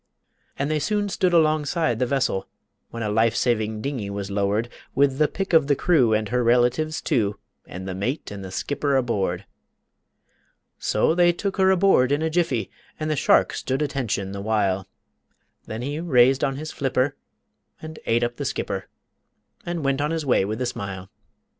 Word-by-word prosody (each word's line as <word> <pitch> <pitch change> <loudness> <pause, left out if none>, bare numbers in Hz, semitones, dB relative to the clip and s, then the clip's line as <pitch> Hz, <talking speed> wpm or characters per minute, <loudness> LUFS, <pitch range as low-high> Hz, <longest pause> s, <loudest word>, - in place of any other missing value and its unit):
And 140 +2 -1
they 155 - +1
soon 205 +4 0
stood 185 -1 +1
alongside 155 -4 +2
the 125 - +1
vessel, 135 -7 0 0.4
When 115 0 -5
a 105 - -1
life 110 +2 +2
saving 110 -3 0
dingey 130 -8 -3
was 100 0 -5
lowered 100 +3 0 0.3
With 135 0 +2
the 150 - +5
pick 195 +2 -4
of 160 -4 +5
the 145 - +3
crew, 135 -8 +3
and 110 -1 +1
her 125 0 +1
relatives, 125 +6 +2
too, 100 -3 0 0.3
And 95 +2 -7
the 95 - -3
mate 105 - -3
and 100 -1 -7
the 95 - -7
skipper 140 +7 -1
aboard. 100 -7 0 1.3
So 105 +9 +2
they 175 0 +4
took 195 +3 -3
her 190 -1 +4
aboard 185 -9 +4
in 145 +2 +1
a 160 - 0
jiffy, 155 -9 0 0.3
And 155 0 -2
the - - +1
shark - - +3
stood 135 +3 -1
attention 115 -9 -2
the 100 0 -5
while, 100 -3 0 0.8
Then 110 +2 -5
he 145 +3 -3
raised 135 -5 +4
on 135 -2 +1
his 155 +3 -6
flipper 135 0 0 0.6
and 155 0 -9
ate 115 +1 +2
up 120 0 -2
the - - -4
skipper - - -3 0.8
And 170 -4 -3
went 135 0 +1
on 150 - 0
his 165 -2 -2
way 125 - +3
with 110 +3 -3
a - - -1
smile. 95 -5 -5
130 Hz, 180 wpm, -24 LUFS, 110-155 Hz, 1.3 s, the